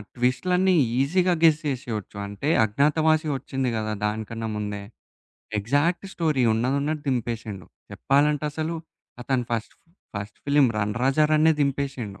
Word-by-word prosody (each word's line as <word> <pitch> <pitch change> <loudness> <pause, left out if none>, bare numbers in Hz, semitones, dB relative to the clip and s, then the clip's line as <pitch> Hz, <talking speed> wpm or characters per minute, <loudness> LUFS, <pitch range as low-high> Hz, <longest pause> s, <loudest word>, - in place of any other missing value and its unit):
ట్విస్టులన్నీ 180 +10 +2 0.3
ఈసీగా 180 +6 +2
గెస్ 155 -2 +6
చేసేయొచ్చు. 115 -7 -4
అంటే 100 +9 -3
అజ్ఞాతవాసి 155 +7 +2
ఒచ్చింది 130 0 -2
కదా! 110 -1 -2
దానికన్నా 110 +1 -3
ముందే, 105 -1 -4 0.8
ఎగ్జాక్ట్ 145 - +1
స్టోరీ 155 -6 +1
ఉన్నదున్నట్టు 140 +6 -1
దింపేసిండు. 115 -6 -3 0.3
చెప్పాలంటే 145 +2 +2
అసలు, 160 +2 -3 0.5
అతను 125 -1 0
ఫస్ట్ 115 -2 -3 0.4
ఫస్ట్ 100 +2 -7
ఫిల్మ్ 140 -2 +4
రన్ 105 0 -1
రాజా 135 +4 +3
రనే 155 +1 +5
దింపేసిండు. 135 -7 -2
135 Hz, 120 wpm, -25 LUFS, 110-155 Hz, 0.8 s, గెస్